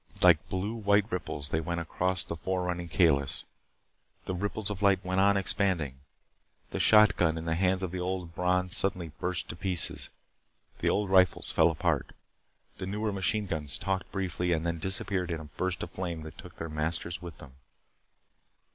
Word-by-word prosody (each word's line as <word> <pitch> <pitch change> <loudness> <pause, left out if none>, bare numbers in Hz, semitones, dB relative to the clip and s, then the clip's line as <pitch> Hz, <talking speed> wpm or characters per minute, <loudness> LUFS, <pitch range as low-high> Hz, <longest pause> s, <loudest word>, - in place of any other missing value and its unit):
Like - - +5
blue 95 +4 -2
white 100 -2 +3
ripples 75 -5 -3
they 80 - 0
went 85 +1 -2
across 90 +2 0
the 90 - -5
fore 95 +2 -2
running 90 -1 -3
Kalis. 70 -3 +2 0.8
The - - -3
ripples 100 +2 -2
of 100 -1 -5
light 100 -2 +3
went 95 +1 0
on 100 0 +4
expanding. 90 -8 0 0.7
The - - -3
shotgun 100 -7 +5
in 80 - -5
the 80 - 0
hands 95 +2 +1
of 90 - -2
the 90 - -4
old 90 -2 -3
Bron 90 +1 +1
suddenly 90 -3 0
burst 90 -1 -2
to - - -5
pieces. 90 -1 +1 0.7
The - - +2
old 100 -2 0
rifles 95 -1 +4
fell - - +5
apart. 80 - -1 0.6
The 95 - -4
newer 105 +2 -2
machine 100 +2 0
guns 75 -6 -2
talked 95 -1 -2
briefly, 90 -2 -1
and 80 0 -1
then 85 -1 -1
disappeared 95 0 -1
in 85 -2 -2
a - - -8
burst 90 +5 -3
of - - -7
flame 85 -4 -4
that 80 - -9
took - - -11
their 80 - -4
masters 80 +2 -2
with 85 -3 -9
them. 70 - -12
90 Hz, 180 wpm, -29 LUFS, 85-95 Hz, 0.8 s, Like